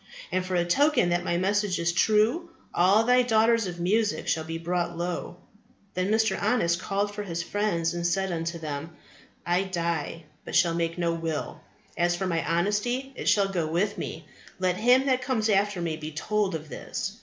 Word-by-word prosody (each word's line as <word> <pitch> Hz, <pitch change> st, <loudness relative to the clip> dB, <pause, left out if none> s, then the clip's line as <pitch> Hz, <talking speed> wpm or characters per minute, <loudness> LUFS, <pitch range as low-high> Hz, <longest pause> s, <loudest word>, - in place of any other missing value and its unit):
And 185 Hz, -, 0 dB
for 185 Hz, 0 st, -3 dB
a 175 Hz, -1 st, +2 dB
token 270 Hz, -, +3 dB
that 175 Hz, 0 st, +1 dB
my 175 Hz, -, 0 dB
message 200 Hz, 0 st, +1 dB
is 170 Hz, 0 st, +1 dB
true, 220 Hz, -, +2 dB, 0.2 s
all 195 Hz, +5 st, +4 dB
thy 250 Hz, +2 st, +5 dB
daughters 230 Hz, -2 st, +3 dB
of 175 Hz, -1 st, -6 dB
music 210 Hz, +5 st, +1 dB
shall 160 Hz, -, 0 dB
be 165 Hz, +1 st, -5 dB
brought 175 Hz, 0 st, -2 dB
low. 175 Hz, 0 st, -4 dB, 0.6 s
Then 185 Hz, +2 st, -1 dB
Mr. 220 Hz, +1 st, +2 dB
Honest 170 Hz, -8 st, +2 dB
called 205 Hz, +1 st, -1 dB
for 210 Hz, -, -4 dB
his 170 Hz, -4 st, -3 dB
friends 185 Hz, -6 st, 0 dB
and 175 Hz, 0 st, -1 dB
said 190 Hz, +2 st, 0 dB
unto 170 Hz, 0 st, -3 dB
them, 155 Hz, 0 st, -6 dB, 0.5 s
I 175 Hz, +2 st, +2 dB
die, 170 Hz, -3 st, -2 dB, 0.2 s
but -, -, -6 dB
shall 170 Hz, -1 st, +4 dB
make 165 Hz, 0 st, -1 dB
no 170 Hz, -1 st, 0 dB
will. 165 Hz, -2 st, -4 dB, 0.3 s
As 175 Hz, 0 st, +2 dB
for 190 Hz, -, -2 dB
my 165 Hz, -3 st, 0 dB
honesty, 210 Hz, +10 st, 0 dB
it -, -, -1 dB
shall 200 Hz, -2 st, +3 dB
go 175 Hz, -5 st, -1 dB
with 200 Hz, +5 st, 0 dB
me: 160 Hz, 0 st, -6 dB, 0.3 s
let 185 Hz, -1 st, 0 dB
him 250 Hz, +5 st, +4 dB
that 260 Hz, -2 st, +2 dB
comes 235 Hz, -5 st, 0 dB
after 205 Hz, -1 st, +2 dB
me 165 Hz, -2 st, -2 dB
be 155 Hz, -1 st, -6 dB
told 200 Hz, +4 st, -1 dB
of 155 Hz, -1 st, -6 dB
this. -, -, -5 dB
180 Hz, 190 wpm, -27 LUFS, 170-210 Hz, 0.6 s, thy